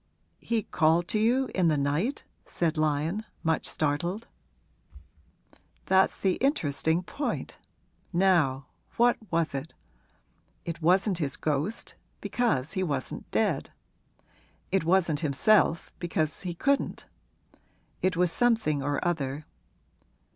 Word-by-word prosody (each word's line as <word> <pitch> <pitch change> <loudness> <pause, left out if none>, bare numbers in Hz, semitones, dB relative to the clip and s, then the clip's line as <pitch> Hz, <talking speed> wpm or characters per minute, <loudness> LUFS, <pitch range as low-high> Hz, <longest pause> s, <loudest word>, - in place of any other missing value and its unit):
'He 230 -2 -1
called 165 +1 +2
to 215 - +1
you 250 +4 +2
in 185 -3 +2
the 155 -2 +2
night?' 145 - -1 0.2
said 165 -2 -1
Lyon, 155 +6 0 0.2
much 160 -1 0
startled. 170 +9 -1 1.6
'That's 190 0 +3
the 190 -2 +1
interesting 165 - +1
point. 285 +10 -4 0.5
Now 170 -8 +2 0.3
what 240 +1 +4
was 165 -3 0
it? 140 +3 -5 0.9
It 170 0 -5
wasn't 185 +3 +3
his 145 -4 -2
ghost, 155 +9 -2 0.3
because 195 - 0
he 190 - -1
wasn't 140 -8 -3
dead. - - 0 1.0
It 195 -1 +2
wasn't 170 -4 +2
himself, 165 +4 +2
because 160 -3 -1
he 180 -3 -4
couldn't. 280 +9 0 1.0
It 185 -1 +1
was 180 -1 +3
something 220 - +2
or 145 +4 -1
other! 145 -3 -2
170 Hz, 110 wpm, -28 LUFS, 150-195 Hz, 1.6 s, what